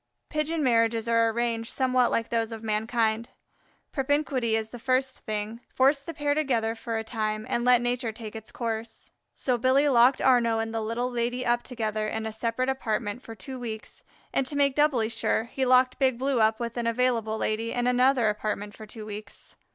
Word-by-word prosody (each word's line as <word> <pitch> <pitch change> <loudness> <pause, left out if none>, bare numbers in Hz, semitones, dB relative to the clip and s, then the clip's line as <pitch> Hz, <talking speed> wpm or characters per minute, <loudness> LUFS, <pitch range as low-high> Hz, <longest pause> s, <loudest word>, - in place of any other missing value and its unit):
Pigeon 305 +1 -1
marriages 230 -2 +2
are 230 0 +3
arranged 230 0 -1
somewhat 255 -2 +2
like 230 0 -1
those 230 -1 0
of 225 0 -7
mankind. 220 +1 0 0.6
Propinquity 270 -4 +1
is 220 0 -2
the 245 - -8
first 260 +1 0
thing: 215 +1 -4
force 275 +2 +3
the 280 +4 -7
pair 290 -2 0
together 245 -7 0
for 230 0 -4
a 220 - -2
time 215 -1 -2
and 240 -2 -1
let 250 -1 +5
nature 245 -1 -1
take 220 -1 -8
its 220 0 -8
course. 225 -1 -5 0.2
So 250 -2 0
Billy 265 +4 +3
locked 250 0 +5
Arnaux 235 -3 +3
and 225 0 -2
the 225 - -1
Little 235 +3 -2
Lady 245 +1 -1
up 240 0 +2
together 215 -4 -3
in 220 +1 -3
a 220 - -4
separate 230 +3 -1
apartment 230 -4 -2
for 225 - -10
two 255 +6 -7
weeks, 220 -3 -7 0.3
and 265 - +1
to 290 - -3
make 280 -1 +3
doubly 275 -6 +2
sure 225 -1 0
he 260 +3 -2
locked 255 0 +4
Big 260 -3 +2
Blue 265 -1 +1
up 220 0 +3
with 235 0 -4
an 235 -1 -1
Available 230 -2 +1
Lady 220 +1 -1
in 245 0 -1
another 250 -1 +3
apartment 210 -1 -2
for 215 - -10
two 215 0 -9
weeks. 210 0 -9
235 Hz, 195 wpm, -27 LUFS, 220-255 Hz, 0.6 s, let